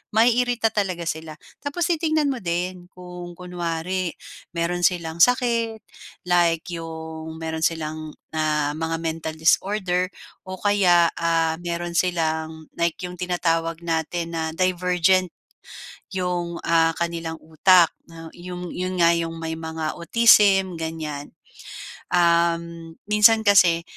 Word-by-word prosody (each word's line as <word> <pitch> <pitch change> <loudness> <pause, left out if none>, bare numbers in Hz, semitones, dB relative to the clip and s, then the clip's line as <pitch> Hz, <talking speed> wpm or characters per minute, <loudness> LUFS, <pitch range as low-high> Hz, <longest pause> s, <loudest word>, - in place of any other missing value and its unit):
maiirita 240 0 +3
talaga 185 -5 -2
sila. 160 -1 -5 0.2
Tapos 285 +5 -3
titingnan 310 -3 +1
mo 255 - -4
din 180 0 -3
kung 180 -1 -10
kunwari 180 0 -3 0.4
meron 170 +1 -1
silang 170 -2 0
sakit, 230 0 +2 0.4
like 170 -2 +2
'yong 160 -1 -7
meron 160 0 -4
silang, 155 -1 -3 0.2
ah, 150 -2 0
mga 160 +1 -2
mental 160 -1 -3
disorder 180 +2 +1 0.4
o 185 - -5
kaya 180 -4 +3
ah, 165 -1 +1
meron 175 0 -4
silang, 160 -3 -1
like 170 -1 +1
'yong 180 0 -7
tinatawag 165 -2 -1
natin 165 +1 -2
na 160 - -1
divergent, 180 0 +2 0.8
'yong, 175 -2 -2
ah, 165 -1 +3
kanilang 170 -1 -3
utak 170 +2 +4 0.2
'no. 165 -1 -11
'Yong 180 0 -7
'yon 185 +1 -3
nga 170 - +6
'yong 165 -1 -3
may 160 0 -4
mga 160 -1 -3
autism 195 -3 +4
ganyan. 155 -3 -5 0.8
Um, 170 -1 +1 0.2
minsan 220 +1 +6
kasi 180 -5 +5
170 Hz, 120 wpm, -23 LUFS, 165-185 Hz, 0.8 s, nga